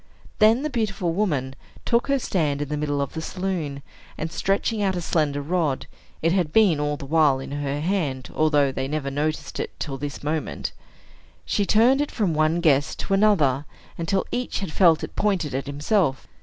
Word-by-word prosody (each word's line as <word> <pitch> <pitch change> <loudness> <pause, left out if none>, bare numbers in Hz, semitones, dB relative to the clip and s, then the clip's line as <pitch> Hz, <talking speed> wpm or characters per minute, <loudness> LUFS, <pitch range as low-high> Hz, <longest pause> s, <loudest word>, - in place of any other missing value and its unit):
Then 225 +5 +5
the 305 - -1
beautiful 195 -8 -1
woman 150 -10 0 0.3
took 235 +2 +2
her 275 0 +2
stand 155 - 0
in 145 -1 -3
the 150 - -1
middle 145 -1 -1
of 140 - -7
the 160 - -4
saloon, 165 -7 -3 0.3
and 160 +1 -4
stretching 200 +4 0
out 190 -2 +1
a - - -1
slender 150 -4 0
rod 155 -4 0 0.4
(it 165 - +3
had 175 -4 +1
been 195 -6 +4
all 150 0 -1
the 140 - -8
while 145 -2 +3
in 135 - -7
her 145 0 -2
hand, 150 -8 -1
although 145 -3 +3
they 130 0 -3
never 140 -1 -2
noticed 150 +2 -2
it - - -5
till 135 -3 -4
this 145 +1 -5
moment), 150 - -2 0.7
she 200 -2 0
turned 245 +6 +4
it 290 - -1
from 200 -8 0
one 155 +2 +2
guest 145 -4 +2
to 195 - -2
another, 160 -10 +3 0.3
until 180 +3 -1
each 250 0 -2
had 190 -5 -4
felt 165 -4 +4
it - - -6
pointed 190 -9 0
at 135 +1 -3
himself. 145 0 0
155 Hz, 190 wpm, -24 LUFS, 145-195 Hz, 0.7 s, Then